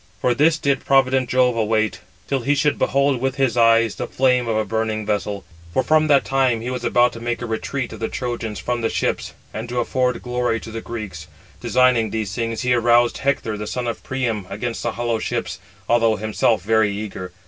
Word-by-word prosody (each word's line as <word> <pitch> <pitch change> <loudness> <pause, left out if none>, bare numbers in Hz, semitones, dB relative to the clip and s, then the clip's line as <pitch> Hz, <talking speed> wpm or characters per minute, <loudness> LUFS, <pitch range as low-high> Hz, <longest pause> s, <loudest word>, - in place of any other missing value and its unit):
For 125 - +2
this 155 +6 +3
did 140 -4 0
provident 130 -2 +3
Jove 125 -1 +3
await, 110 -1 0 0.3
till 135 - 0
he 140 +4 +1
should 145 +1 +1
behold 140 -2 +2
with 135 0 0
his 135 -4 +1
eyes 115 -1 +4
the - - -5
flame 125 -2 +2
of 110 -1 0
a 110 - 0
burning 110 -1 -2
vessel; 105 -1 -2 0.3
for 130 - +3
from 155 0 +3
that 140 -2 +4
time 130 -4 +2
he 120 +3 -4
was 125 -1 -4
about 120 +1 +3
to 115 - -8
make 120 +1 -2
a 120 - -4
retreat 120 +3 -3
of - - -9
the 110 - -1
Trojans 120 -4 -4
from 120 -1 -2
the 115 - 0
ships, - - -2 0.2
and 115 +2 -5
to 120 0 -1
afford 125 0 0
glory 125 -2 -1
to 115 - -9
the 115 +1 -5
Greeks. 105 -10 -7 0.3
Designing 120 -1 +3
these 105 -2 -3
things, 115 0 -2
he 125 0 +2
aroused 120 0 +3
Hector, 135 -5 -1
the 105 - -5
son 125 +2 -3
of 115 - -3
Priam, 115 -7 -2
against 115 +4 -4
the 120 - -2
hollow 115 -1 -1
ships, - - -3 0.3
although 115 -2 +3
himself 110 0 0
very 110 0 +2
eager. 100 -3 -6
120 Hz, 210 wpm, -21 LUFS, 110-125 Hz, 0.3 s, eyes